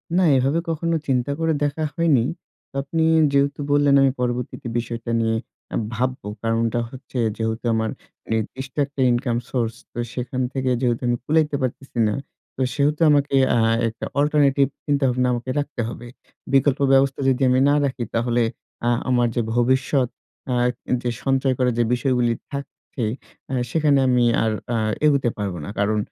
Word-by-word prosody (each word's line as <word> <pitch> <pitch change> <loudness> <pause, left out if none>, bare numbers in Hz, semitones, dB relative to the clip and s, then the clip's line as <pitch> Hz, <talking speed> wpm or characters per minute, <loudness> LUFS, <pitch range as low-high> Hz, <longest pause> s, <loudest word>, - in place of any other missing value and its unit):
না, 185 - +4
এভাবে 135 +5 +2
কখনো 165 +1 0
চিন্তা 130 0 +1
করে 165 0 +1
দেখা 145 +2 -1
হয়নি। 160 -9 +3 0.5
তো - - -20
আপনি 160 +3 -1 0.3
যেহেতু 140 +1 +2
বললেন 145 -1 +4
আমি 135 -1 +4
পরবর্তীতে 125 0 -3
বিষয়টা 115 0 -4
নিয়ে 115 0 +1 0.4
আ - - -1 0.2
ভাববো। 130 +1 -2 0.2
কারণটা 115 +1 +1
হচ্ছে 130 +1 -9 0.2
যেহেতু 110 +1 -2
আমার 110 0 0 0.4
নির্দিষ্ট 130 +4 -4
একটা 140 -1 -5
ইনকাম 120 -1 0
সোর্স। 115 -3 -1 0.2
তো - - -12 0.2
সেখান 130 +1 -3
থেকে 130 -1 -1
যেহেতু 120 -2 +1
আমি 120 0 +1
কুলাইতে 155 0 +2
পারতেছি 130 0 -4
না। 105 - 0 0.4
তো - - -4
সেহেতু 145 +3 +1
আমাকে 145 -1 +3 0.2
আ - - +3 0.3
একটা 110 - -5
অল্টারনেটিভ 145 -2 +3 0.2
চিন্তাভাবনা 130 -4 +1
আমাকে 120 +1 -4
রাখতে 145 -4 -3
হবে। 120 0 -7 0.5
বিকল্প 135 0 +3
ব্যবস্থা 135 0 +3
যদি 130 0 0
আমি 130 0 +3
না - - +4
রাখি, 130 -3 -2
তাহলে 120 +1 +1 0.5
আ - - +4 0.2
আমার 120 -1 +3
যে 120 - +2
ভবিষ্যৎ 130 +2 +2 0.4
আ - - +1 0.3
এ - - -1
যে 120 - 0
সঞ্চয় 135 -1 +2
করা 125 -1 +2
যে 120 - +3
বিষয়গুলি 125 -2 +1 0.2
থাকছে 140 -3 -6 0.5
আ - - -2 0.2
সেখানে 145 -1 +3
আমি 125 -1 +3 0.2
আর 110 - +1 0.2
আ - - +1 0.3
এগুতে 140 -5 +3
পারব 100 -3 -2
না। - - -6
কারণ 105 +1 +1
130 Hz, 165 wpm, -22 LUFS, 120-140 Hz, 0.5 s, না